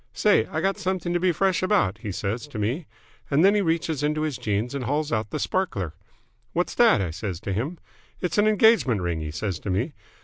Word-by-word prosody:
'Say, 210 - +3
I 160 - -3
got 195 +2 0
something 185 -3 -1
to 175 - +2
be 180 +1 +3
fresh 190 +2 +1
about!' 185 - +2
he 110 -3 -5
says 105 +8 -3
to 145 - -8
me. 120 - -2 0.4
And 150 +5 +4
then 200 - +6
he 210 - +2
reaches 160 -4 0
into 150 +1 0
his 155 -6 -2
jeans 105 +4 -1
and 135 -3 -3
hauls 145 +4 -1
out 110 -2 -1
the - - -3
sparkler. 100 - -1 0.6
'What's - - 0
that?' - - +5
I 90 -4 -2
says 90 0 -4
to 100 - -3
him. 135 - -2 0.4
'It's 180 +2 -1
an 210 - +4
engagement 215 - +4
ring,' 85 -2 -1
he 80 -1 -4
says 85 +3 -3
to 105 - -6
me. 115 - -1
145 Hz, 225 wpm, -25 LUFS, -, 0.6 s, then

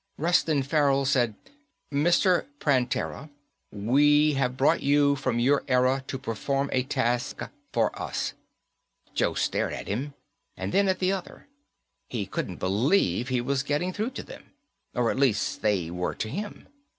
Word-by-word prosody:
Reston 155 -3 +2
Farrell 140 -1 +2
said, 125 -5 +2 0.6
"Mr. 175 +5 +3
Prantera, 135 +1 0 0.4
we 145 +8 +4
have 130 -2 -1
brought 145 +5 +3
you 140 0 +3
from 130 -3 -1
your 135 +4 +3
era 130 +1 +2
to 135 - -3
perform 135 +3 -2
a 130 - +3
task 125 -2 -1 0.3
for 115 -2 +1
us." - - -3 0.8
Joe - - +1
stared - - 0
at - - -6
him, 135 +8 -3 0.4
and - - -3
then 200 +1 +4
at 190 -1 +2
the 185 0 +1
other. 190 -2 -6 0.6
He 110 -5 -3
couldn't 95 -1 -4
believe 110 - +1
he 130 -2 0
was 135 +2 0
getting 150 +6 -1
through 215 +5 -2
to - - -5
them. - - -13 0.4
Or, 120 -2 +2
at - - -3
least, 130 -7 +2
that - - +1
they 90 -6 0
were 90 +1 -2
to 110 - -3
him. 205 - -6
135 Hz, 155 wpm, -27 LUFS, 120-150 Hz, 0.8 s, we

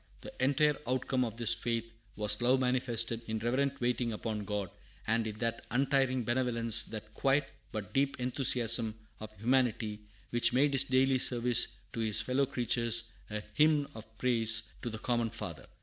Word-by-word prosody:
The - - -10
entire 145 +2 +3
outcome 130 0 0
of 115 -2 -5
this 115 -1 +3
faith 115 0 -2 0.3
was 105 +2 0
love 125 +2 +3
manifested 120 -3 0
in 110 0 -2
reverent 135 +5 -1
waiting 120 -1 -1
upon 105 -1 -4
God, 100 -3 -3 0.3
and 115 0 0
in 105 -1 -6
that 115 0 -3
untiring 130 0 +1
benevolence, 115 -2 +2
that 110 -1 -9
quiet 135 0 +1 0.2
but 105 -1 -6
deep 140 0 0
enthusiasm 120 -3 +2 0.2
of 110 - -8
humanity, 115 -2 0 0.3
which 120 0 +2
made 140 +3 +3
his 135 0 +4
daily 130 0 +2
service 120 -2 +4 0.3
to - - -5
his 110 -2 +3
fellow 130 +5 0
creatures 115 -1 +1 0.2
a 105 0 -5
hymn 150 -2 +3
of 110 0 -12
praise 115 -2 +3
to 120 - -4
the 110 - -6
common 120 0 -1
Father. 105 -10 -8
120 Hz, 165 wpm, -31 LUFS, 110-130 Hz, 0.3 s, his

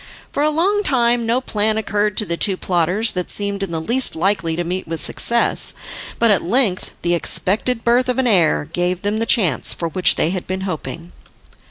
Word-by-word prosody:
For - - -2
a 300 - +3
long 375 +7 +1
time 240 - +1
no 235 +2 +2
plan 215 -3 0
occurred 210 -2 -1
to 215 - +2
the 170 - -2
two 190 +2 +1
plotters 180 +6 0
that 180 -1 -4
seemed 200 -1 -3
in 195 - -3
the 165 -1 -3
least 240 +10 0
likely 170 -2 0
to 175 - -2
meet 180 +2 -4
with 165 0 -4
success, 235 0 +1 0.4
but 230 -2 +3
at 200 - +3
length 195 -1 +1
the 175 0 +1
expected 220 +7 0
birth 245 +1 +2
of 250 - -1
an 265 - +1
heir 175 -10 +2
gave 175 +3 -2
them 205 +2 -1
the 230 - -1
chance 180 - +2
for 170 - -3
which 185 +2 +2
they 165 - 0
had 185 -2 -5
been 190 +1 -3
hoping. 170 -1 -5
200 Hz, 205 wpm, -19 LUFS, 175-235 Hz, 0.4 s, a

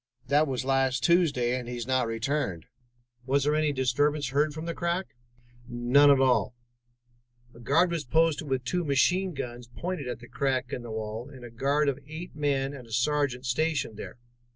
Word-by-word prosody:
That 150 +2 +4
was 130 -1 -2
last 135 -1 +1
Tuesday, 145 -9 +3
and 120 - -8
he 125 - -4
has 120 -2 -4
not 130 -2 +1
returned." 115 - -2 0.6
"Was 140 +1 +2
there 150 +1 +2
any 155 -1 +2
disturbance 140 +2 +1
heard 145 +3 +1
from 155 +2 -7
the 170 - -3
crack?" 170 -8 -2 0.5
"None 125 +4 +4
at 140 -1 +6
all. 130 -1 +2 1.0
A 115 - -15
guard 160 +9 +2
was 165 -3 -2
posted 160 +3 +1
with 130 -1 0
two 180 +7 -1
machine 180 +5 +2
guns 120 -2 -6
pointed 155 +3 -5
at 120 -2 -3
the 120 - -12
crack 135 -1 -1
in - - -3
the 120 - -9
wall, 110 +3 -5
and 130 -4 -11
a 120 - -10
guard 140 +5 +1
of 140 -1 0
eight 160 +3 -8
men 140 -2 0
and 130 -4 -10
a - - -16
sergeant 130 +1 0
stationed 145 -2 0
there. 110 - -8
135 Hz, 190 wpm, -28 LUFS, 125-150 Hz, 1.0 s, at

